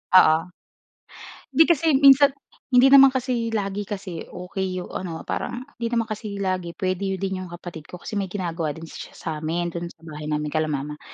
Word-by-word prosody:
Oo. 160 Hz, -4 st, +8 dB, 1.2 s
'Di 320 Hz, -, +8 dB
kasi 320 Hz, -2 st, +3 dB
minsan 275 Hz, 0 st, +7 dB, 0.3 s
hindi 260 Hz, +1 st, +5 dB
naman 275 Hz, 0 st, +10 dB
kasi 250 Hz, -3 st, -1 dB
lagi 200 Hz, -1 st, -2 dB
kasi 190 Hz, -5 st, -6 dB
okey 185 Hz, 0 st, -4 dB
yung -, -, -11 dB
ano, 170 Hz, -3 st, -5 dB
parang 245 Hz, +1 st, -4 dB, 0.2 s
hindi 235 Hz, -, -1 dB
naman 230 Hz, -1 st, +1 dB
kasi 210 Hz, -1 st, -5 dB
lagi 185 Hz, -3 st, -2 dB
puwede 190 Hz, +1 st, -1 dB
din 190 Hz, 0 st, -3 dB
yung 185 Hz, -, -6 dB
kapatid 170 Hz, -2 st, -9 dB
ko -, -, -9 dB
kasi 210 Hz, -3 st, -3 dB
may 195 Hz, -, -2 dB
ginagawa 170 Hz, -5 st, -3 dB
din 160 Hz, -, -10 dB
siya 160 Hz, -, -9 dB
sa'min, 165 Hz, +2 st, -3 dB
do'n 170 Hz, 0 st, -4 dB
sa 170 Hz, -, -16 dB
bahay 150 Hz, -2 st, -7 dB
namin, 150 Hz, 0 st, -2 dB
kila 155 Hz, 0 st, 0 dB
mama. 150 Hz, 0 st, -4 dB
185 Hz, 185 wpm, -24 LUFS, 165-225 Hz, 1.2 s, naman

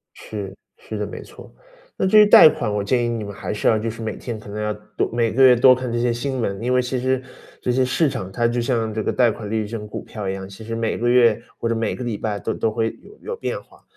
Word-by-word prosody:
是， 100 Hz, -3 st, -7 dB, 0.2 s
是 465 Hz, -1 st, -7 dB
的， -, -, -2 dB
没 -, -, -8 dB
错。 -, -, -14 dB, 0.4 s
那 -, -, 0 dB
至 215 Hz, +3 st, +6 dB
于 210 Hz, -, +8 dB
贷 205 Hz, -6 st, +9 dB
款， 110 Hz, -7 st, -3 dB
我 105 Hz, -, -1 dB
建 120 Hz, +4 st, +1 dB
议 -, -, 0 dB
你 115 Hz, -2 st, -3 dB
们 100 Hz, -, -7 dB
还 100 Hz, -, -5 dB
是 105 Hz, -, -1 dB
要 110 Hz, -, +4 dB
就 110 Hz, +2 st, -2 dB
是 115 Hz, +1 st, -8 dB
每 110 Hz, -1 st, -3 dB
天 115 Hz, -3 st, -6 dB
可 105 Hz, -, -12 dB
能 105 Hz, +1 st, -5 dB
要 105 Hz, 0 st, -1 dB, 0.2 s
多 -, -, +1 dB
每 115 Hz, -1 st, +1 dB
个 135 Hz, +3 st, +3 dB
月 130 Hz, -1 st, +8 dB
多 130 Hz, +2 st, +7 dB
看 125 Hz, -1 st, -4 dB
这 120 Hz, -, -1 dB
些 120 Hz, 0 st, +1 dB
新 130 Hz, +2 st, -3 dB
闻， 100 Hz, -1 st, -2 dB
因 125 Hz, +1 st, +1 dB
为 125 Hz, -, +4 dB
其 125 Hz, 0 st, -2 dB
实 130 Hz, 0 st, 0 dB, 0.4 s
这 125 Hz, -, 0 dB
些 130 Hz, +1 st, +2 dB
市 145 Hz, +3 st, +1 dB
场， 95 Hz, -6 st, -5 dB
它 115 Hz, +4 st, +1 dB
就 120 Hz, 0 st, -1 dB
像 115 Hz, -3 st, -1 dB
这 110 Hz, 0 st, -2 dB
个 -, -, 0 dB
贷 125 Hz, -2 st, +4 dB
款 105 Hz, -1 st, -7 dB
利 110 Hz, -, -1 dB
率， 105 Hz, -, -3 dB
这 115 Hz, +2 st, -5 dB
种 105 Hz, -1 st, -8 dB
股 -, -, -6 dB
票 105 Hz, -3 st, -7 dB
一 -, -, -1 dB
样， 95 Hz, 0 st, -6 dB
其 100 Hz, +3 st, -11 dB
实 115 Hz, +1 st, -5 dB
每 115 Hz, -1 st, -1 dB
个 120 Hz, +1 st, 0 dB
月 120 Hz, -3 st, +4 dB, 0.2 s
或 -, -, -2 dB
者 115 Hz, -, 0 dB
每 115 Hz, -1 st, -1 dB
个 125 Hz, -, -6 dB
礼 115 Hz, -4 st, -3 dB
拜 105 Hz, -1 st, -3 dB
都 110 Hz, -, -3 dB
都 110 Hz, -, -1 dB
会 110 Hz, +1 st, 0 dB
有 420 Hz, -, -16 dB
有 475 Hz, -, -5 dB
变 -, -, -4 dB
化。 -, -, -23 dB
115 Hz, 325 characters per minute, -21 LUFS, 105-125 Hz, 0.4 s, 贷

